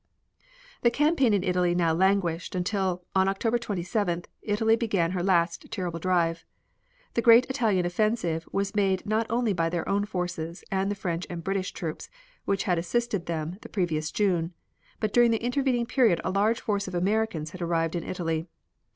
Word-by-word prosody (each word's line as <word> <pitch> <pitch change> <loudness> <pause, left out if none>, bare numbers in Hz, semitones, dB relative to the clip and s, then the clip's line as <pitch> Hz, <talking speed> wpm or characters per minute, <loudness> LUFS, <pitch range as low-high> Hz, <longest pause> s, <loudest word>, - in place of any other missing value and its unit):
The 240 - +5
campaign 290 -1 +2
in 200 -3 +2
Italy 180 -2 +1
now 170 -2 +2
languished, 185 -1 +1
until, 180 -1 -1
on 190 0 +3
October 225 +5 +1
27th, 185 -4 -2 0.2
Italy 220 +2 +2
began 200 -8 0
her 185 -1 -1
last 175 -2 +1
terrible 180 -5 -3
drive. 170 -2 +1 0.7
The 235 - +1
great 235 +2 +7
Italian 215 -9 +1
offensive 175 -3 0
was 195 +1 -1
made 195 -3 +1
not 220 +1 0
only 230 -2 +1
by 165 -2 0
their 170 0 -3
own 200 +1 +1
forces 175 -4 -4
and 195 0 0
the 205 - -1
French 175 -3 -3
and 170 -1 -6
British 195 0 -1
troops, 160 -3 -6 0.4
which 195 -1 0
had 180 -5 +1
assisted 205 +1 -1
them 165 +2 -3
the - - -10
previous 160 -6 -1
June, 180 -4 0 0.4
but 215 -2 -1
during 240 -1 +6
the 225 0 0
intervening 245 -1 +1
period 235 -7 +3
a 185 - -1
large 210 +4 +2
force 200 -2 -1
of 185 - -5
Americans 185 -4 0
had 185 - -9
arrived 165 -1 0
in 170 - -2
Italy. 165 -2 -2
190 Hz, 175 wpm, -27 LUFS, 170-215 Hz, 0.7 s, great